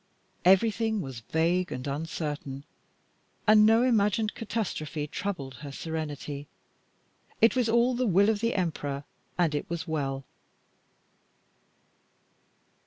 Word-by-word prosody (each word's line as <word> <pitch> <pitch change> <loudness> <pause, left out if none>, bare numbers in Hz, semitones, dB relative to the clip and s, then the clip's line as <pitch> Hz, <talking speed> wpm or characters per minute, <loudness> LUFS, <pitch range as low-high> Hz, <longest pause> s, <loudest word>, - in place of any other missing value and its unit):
Everything 220 +3 +4
was 135 -9 -5
vague 170 +8 0
and 125 0 -4
uncertain, 145 -2 -4 0.8
and 215 0 +7
no 225 +2 +5
imagined 215 -3 +2
catastrophe 170 -9 -3
troubled 150 -6 -4
her 140 +2 -8
serenity. 150 -2 -5 0.9
It 225 - +5
was 245 -3 +2
all 235 +2 +4
the 250 0 0
will 200 +2 +4
of 210 - -2
the 230 +2 0
Emperor, 145 -6 -2 0.3
and 170 -4 +2
it 145 - -3
was 170 +1 -4
well. 135 -4 -2
170 Hz, 110 wpm, -28 LUFS, 145-215 Hz, 0.9 s, and